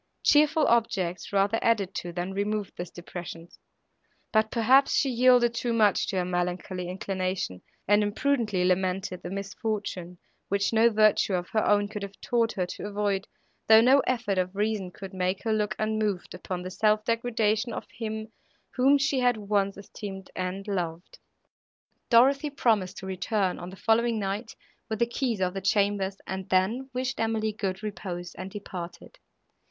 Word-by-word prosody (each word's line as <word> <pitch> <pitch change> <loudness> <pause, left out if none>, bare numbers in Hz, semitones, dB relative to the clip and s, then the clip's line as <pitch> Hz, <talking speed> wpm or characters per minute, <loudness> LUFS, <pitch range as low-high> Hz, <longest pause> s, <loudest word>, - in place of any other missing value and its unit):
Cheerful 300 +1 +4
objects 195 -6 0
rather 200 +3 +2
added 205 -5 +1
to, 175 -4 -4
than 175 +2 -4
removed 205 +1 -2
this 175 -1 -6
depression; 175 -1 -8 0.8
but, 220 0 +3
perhaps, 255 +5 +4
she 270 - +2
yielded 245 -1 +5
too 235 0 -1
much 215 -4 +3
to - - -3
her 180 - +1
melancholy 180 0 -2
inclination, 185 - -3 0.3
and 205 +1 +5
imprudently 210 -3 0
lamented 185 0 0
the 175 - -6
misfortune, 195 -2 -4 0.3
which 200 +2 +1
no 225 +1 +5
virtue 215 -3 +3
of 180 0 -3
her 215 - +1
own 205 0 +3
could 210 0 -6
have 200 0 -8
taught 235 -2 +1
her 185 - -1
to 180 - -6
avoid, 205 -1 -1 0.4
though 220 0 +9
no 255 +5 +6
effort 225 -6 0
of 185 +1 -2
reason 210 -2 -1
could 195 +2 -10
make 185 0 -1
her 225 - +1
look 210 -1 0
unmoved 215 -4 -1
upon 180 -1 -5
the 185 - -6
self 215 +2 +2
degradation 230 -1 0
of - - -5
him, 220 -1 -5 0.4
whom 270 +3 +4
she 275 -1 +1
had 245 -2 +3
once 200 -2 0
esteemed 200 -1 -8
and 185 +2 -4
loved. 175 -3 -4 0.9
Dorothée 275 +4 +4
promised 200 -5 +1
to 190 - -7
return, 190 0 -1
on 175 - -7
the 190 - -10
following 230 +3 +2
night, 205 +3 -3 0.3
with 220 - -2
the 235 - +3
keys 235 -2 -2
of 180 -1 0
the 195 - -4
chambers, 200 0 +1
and 190 0 -5
then 215 +9 +1
wished 255 0 -3
Emily 220 -1 0
good 195 -1 -3
repose, 180 -4 -5
and 185 +1 -7
departed. 195 - -8
205 Hz, 165 wpm, -27 LUFS, 185-225 Hz, 0.9 s, though